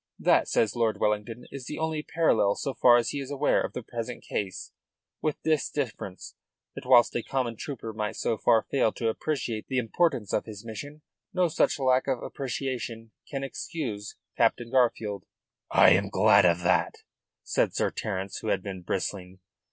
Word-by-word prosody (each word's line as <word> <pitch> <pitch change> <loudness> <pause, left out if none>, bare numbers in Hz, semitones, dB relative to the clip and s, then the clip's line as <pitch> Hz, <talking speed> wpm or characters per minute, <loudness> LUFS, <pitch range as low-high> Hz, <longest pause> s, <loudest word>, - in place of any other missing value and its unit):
That, - - +3
says 110 0 +1
Lord 110 -3 +1
Wellington, 105 +3 -1
is 135 -3 -8
the - - -5
only 160 -1 -1
parallel, 115 -11 +2
so 135 - -3
far 120 -1 +6
as 120 - 0
he 145 - -3
is 135 -1 -6
aware, 145 0 +2
of - - -3
the 125 - -5
present 120 +1 -6
case, 95 -3 -4 0.5
with 155 -2 -1
this 155 -2 +1
difference, 110 -9 -5 0.4
that - - -9
whilst 120 -2 +6
a 120 - +1
common 125 -2 -2
trooper 115 -2 -6
might 105 0 -3
so 115 - 0
far 110 -1 +4
fail 130 -5 +3
to 115 - -1
appreciate 115 -3 -3
the 130 - -2
importance 125 - 0
of - - +1
his 105 -1 -9
mission, 145 +8 -8 0.3
no 180 -1 +3
such 160 - +2
lack 130 -1 +2
of 130 -3 -1
appreciation 125 -4 -4 0.2
can 135 -1 -3
excuse 125 -6 -5 0.2
Captain 115 0 +1
Garfield." 115 -5 +1 0.4
"I - - +6
am 95 +3 +3
glad 100 0 +5
of 85 0 +3
that," 90 +1 +1 0.4
said - - 0
Sir - - +1
Terence, 95 -2 -4
who - - -7
had - - 0
been 95 -2 -6
bristling. 95 +1 -4
115 Hz, 175 wpm, -27 LUFS, 105-135 Hz, 0.5 s, far